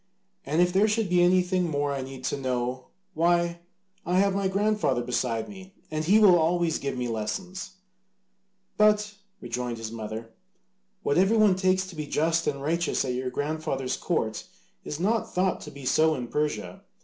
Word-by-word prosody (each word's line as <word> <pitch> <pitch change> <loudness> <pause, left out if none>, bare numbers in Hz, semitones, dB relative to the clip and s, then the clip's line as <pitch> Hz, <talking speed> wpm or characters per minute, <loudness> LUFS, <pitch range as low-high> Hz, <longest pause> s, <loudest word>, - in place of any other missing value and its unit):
And 155 +5 +3
if 180 0 0
there 200 +3 +4
should 215 -2 0
be 180 0 +4
anything 180 0 +3
more 145 -1 -1
I 135 - -3
need 130 0 -8
to - - -1
know, 125 0 -2 0.3
why, 170 +1 +1 0.4
I 180 +2 0
have 195 0 +3
my 195 0 0
grandfather 200 - +1
beside 120 -2 -1
me, 190 -1 -12 0.2
and 155 0 -1
he 195 +7 +5
will 195 -5 +7
always 165 0 +1
give 140 -2 -3
me 125 -1 -2
lessons." 180 - -4 1.0
"But," 210 0 +3 0.3
rejoined 120 0 -4
his 115 -1 -6
mother, 110 0 -6 0.7
"what 145 - +2
everyone 210 0 +4
takes 185 0 +1
to 185 -2 -11
be 150 -1 -5
just 165 +3 +1
and 140 -1 -2
righteous 165 0 0
at 125 - -1
your 125 +1 -2
grandfather's 145 -2 -2
court 110 -11 -2 0.4
is 150 - -5
not 215 +4 0
thought 185 0 +1
to - - -8
be 140 -1 -11
so 155 +4 +3
in 125 -3 -5
Persia. 115 -12 -2
160 Hz, 175 wpm, -27 LUFS, 130-185 Hz, 1.0 s, will